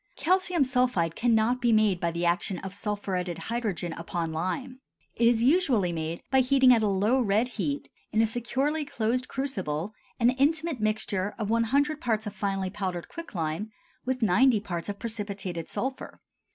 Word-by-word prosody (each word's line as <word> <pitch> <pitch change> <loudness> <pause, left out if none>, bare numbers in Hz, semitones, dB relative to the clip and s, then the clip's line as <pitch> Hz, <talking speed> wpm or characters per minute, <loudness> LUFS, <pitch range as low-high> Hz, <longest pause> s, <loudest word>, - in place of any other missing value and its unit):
Calcium 360 -2 +2
sulphide 250 -11 +1
cannot 235 +1 +2
be 240 -1 +3
made 215 -4 +3
by 170 - 0
the 170 +1 -2
action 175 +2 0
of 195 +1 -7
sulphuretted 195 -4 -3
hydrogen 205 -6 -3
upon 165 -1 -4
lime. 220 +11 -3 0.4
It 235 - +3
is 235 -1 +3
usually 260 - +3
made 165 0 -4
by 265 - +5
heating 260 0 +5
at 230 - +3
a 215 - +2
low 205 +7 +2
red 220 +2 +2
heat, 155 -12 -3 0.2
in 220 - +1
a 225 - +5
securely 265 +7 -1
closed 250 -2 -1
crucible, 200 - -3 0.3
an 240 +1 +5
intimate 305 +2 +1
mixture 210 -2 -1
of 215 -1 -2
100 280 +7 +1
parts 220 -2 0
of 210 - -5
finely 195 -2 -2
powdered 185 -4 -4
quicklime 180 - -4 0.3
with 255 -1 -1
90 225 +4 +4
parts 175 -3 -4
of 205 - -4
precipitated 200 -7 -5
sulphur. 265 +1 -4
220 Hz, 165 wpm, -27 LUFS, 185-255 Hz, 0.4 s, by